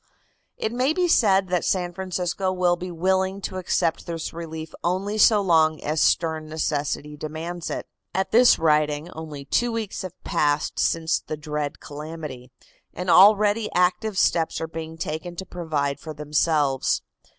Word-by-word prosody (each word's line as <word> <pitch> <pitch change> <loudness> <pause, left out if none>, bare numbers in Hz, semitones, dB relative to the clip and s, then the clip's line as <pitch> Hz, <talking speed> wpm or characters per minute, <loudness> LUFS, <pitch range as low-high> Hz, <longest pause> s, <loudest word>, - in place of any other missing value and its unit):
It 220 - -2
may 255 +5 +1
be 360 +1 +1
said 195 - +3
that 180 -1 +1
San 180 -2 0
Francisco 185 0 -2
will 180 -1 +2
be 180 +1 -6
willing 190 +3 0
to 185 - -4
accept 175 -2 0
this 165 -1 -4
relief 160 -1 -7
only 195 +5 -1
so 210 -1 +6
long 160 -4 +3
as 155 +1 0
stern 160 -2 +1
necessity 150 -1 -2
demands 160 +3 -5
it. - - -4 0.3
At 190 0 -1
this 240 +2 +6
writing 150 0 +1
only 155 -4 -8
two 240 - +1
weeks 225 -3 -3
have 185 -2 -8
passed 145 0 0
since 165 0 +1
the 155 - -6
dread 150 -1 -4
calamity, 150 -4 -8 0.5
and 180 0 -1
already 210 +2 +5
active 185 +3 +1
steps 165 -3 +2
are - - -2
being 160 0 -7
taken 160 +3 -4
to 190 - -6
provide 150 -6 -2
for 155 0 -8
themselves. 150 -2 +1
165 Hz, 155 wpm, -24 LUFS, 155-190 Hz, 0.5 s, so